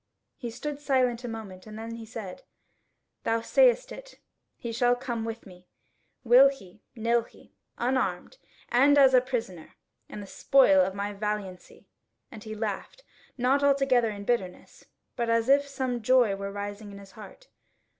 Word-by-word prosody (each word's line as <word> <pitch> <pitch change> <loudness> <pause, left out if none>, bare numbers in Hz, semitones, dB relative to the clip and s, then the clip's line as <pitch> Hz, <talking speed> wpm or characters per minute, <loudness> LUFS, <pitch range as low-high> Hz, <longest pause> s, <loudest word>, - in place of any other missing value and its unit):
He 240 - -6
stood 290 +5 -6
silent 255 -4 0
a - - -5
moment 215 -4 -8
and 215 0 -9
then 225 +1 -7
he 230 -1 -9
said: 210 -5 -8 0.8
"Thou 225 0 0
sayest - - +3
it; - - -11 0.4
he 235 - -6
shall 245 +2 +2
come 240 -2 -4
with 225 0 -6
me, 180 -1 -16 0.6
will 255 +3 +7
he, 205 -8 -12
nill 235 +1 +1
he, 230 - -19 0.2
unarmed, 250 - -2 0.3
and 280 +4 +4
as 270 -2 +6
a 255 - +6
prisoner, 225 -10 -5 0.3
and 210 - -8
the - - -9
spoil 200 -3 +4
of 190 +1 -3
my 200 +1 -3
valiancy." 205 -3 -6 0.5
And 215 - -11
he 215 -1 -7
laughed, 215 - -5 0.3
not 260 +3 +2
altogether 275 -4 +3
in 205 -1 -7
bitterness, 195 -7 -3 0.3
but 235 -1 -2
as 230 0 +1
if 280 +1 +4
some 260 -3 -3
joy 240 -3 +3
were 200 0 -6
rising 205 +1 -7
in 200 - -10
his 200 -1 -14
heart. 215 - -14
230 Hz, 165 wpm, -27 LUFS, 205-260 Hz, 0.8 s, will